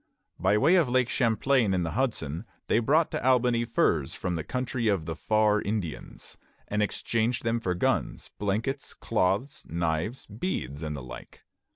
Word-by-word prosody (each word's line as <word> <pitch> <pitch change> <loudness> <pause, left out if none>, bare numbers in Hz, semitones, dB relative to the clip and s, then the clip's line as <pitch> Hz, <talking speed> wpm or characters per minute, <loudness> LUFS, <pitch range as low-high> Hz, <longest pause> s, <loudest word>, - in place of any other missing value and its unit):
By 95 +4 +3
way 170 +12 +5
of 160 -8 +3
Lake 125 0 +2
Champlain 115 -2 +2
and 90 -2 0
the 80 - -3
Hudson 105 - -2 0.2
they - - +3
brought 150 +8 +3
to - - -3
Albany 125 -2 +3
furs 85 - +1
from 90 -2 -2
the 80 - -3
country 125 0 -2
of 95 -7 +1
the 80 0 -4
"Far 105 +2 +2
Indians," 100 -6 -5 0.3
and 105 0 0
exchanged 115 +3 0
them 115 0 +1
for 90 -5 -1
guns, 90 - -1
blankets, 115 +7 -2
cloths, 105 +11 0
knives, 85 +8 -2
beads, 100 - -4
and 75 -2 -3
the 70 - -7
like. - - -11
110 Hz, 165 wpm, -28 LUFS, 85-125 Hz, 0.3 s, way